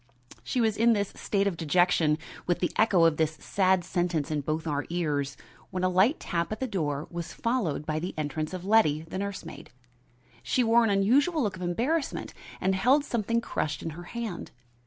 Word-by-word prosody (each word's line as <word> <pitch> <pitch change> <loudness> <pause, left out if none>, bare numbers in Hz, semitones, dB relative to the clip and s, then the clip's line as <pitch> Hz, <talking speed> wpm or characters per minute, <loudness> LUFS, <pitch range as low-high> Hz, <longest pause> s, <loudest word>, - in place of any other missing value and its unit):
She 255 - -2
was 220 -3 +2
in 230 +1 +5
this 205 -2 -1
state 200 -1 0
of 200 -3 0
dejection, 165 -1 +3 0.3
with 175 - +2
the 175 - -1
echo 190 -6 +4
of 165 -2 +3
this 160 -1 +1
sad 185 +3 +1
sentence 175 -4 -1
in 150 -1 0
both 155 +3 -2
our 145 -3 -1
ears, 145 -5 -1 0.3
when 185 -1 -3
a 185 - +3
light 190 - +3
tap 170 +1 -2
at 215 - -3
the 265 - -1
door 155 - -2
was 170 -1 -5
followed 220 - -1
by 155 0 -1
the 180 +4 -5
entrance 155 +1 -3
of 185 -1 -6
Letty, 175 -8 +3
the 165 +3 -6
nurse 200 0 -4
maid. - - -10 0.7
She 255 - +1
wore 235 +1 +5
an 225 - +2
unusual 265 - +3
look 200 -4 -1
of 185 - -10
embarrassment 250 - -1 0.3
and 190 +1 +1
held 255 +10 +3
something 230 -1 0
crushed 155 -8 -3
in 165 - -3
her 175 +3 -9
hand. 225 -4 -5
185 Hz, 200 wpm, -28 LUFS, 160-220 Hz, 0.7 s, in